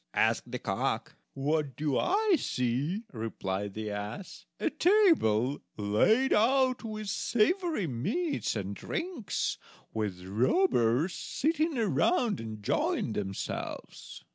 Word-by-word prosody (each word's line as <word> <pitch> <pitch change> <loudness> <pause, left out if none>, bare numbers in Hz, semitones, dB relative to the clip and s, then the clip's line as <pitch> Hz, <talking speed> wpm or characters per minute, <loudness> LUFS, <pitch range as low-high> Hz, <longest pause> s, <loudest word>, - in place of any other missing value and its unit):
asked - - +2
the - - -3
cock. - - -2 0.2
"What 145 -1 0
do 150 -3 -1
I 405 - +3
see?" 140 - -1
replied 100 -3 -3
the 110 -1 -4
ass; 105 - -6
"a - - 0
table 300 - +3 0.2
laid 160 - +3
out 255 +3 +3
with 215 -2 -5
savory 240 - +1
meats 200 - -1
and 100 -1 -3
drinks, 330 - -3 0.3
with 100 -5 -3
robbers 125 - +2
sitting 315 0 0
around 230 - +2
enjoying 110 0 -1
themselves." 95 -2 -5
160 Hz, 105 wpm, -30 LUFS, -, 0.3 s, I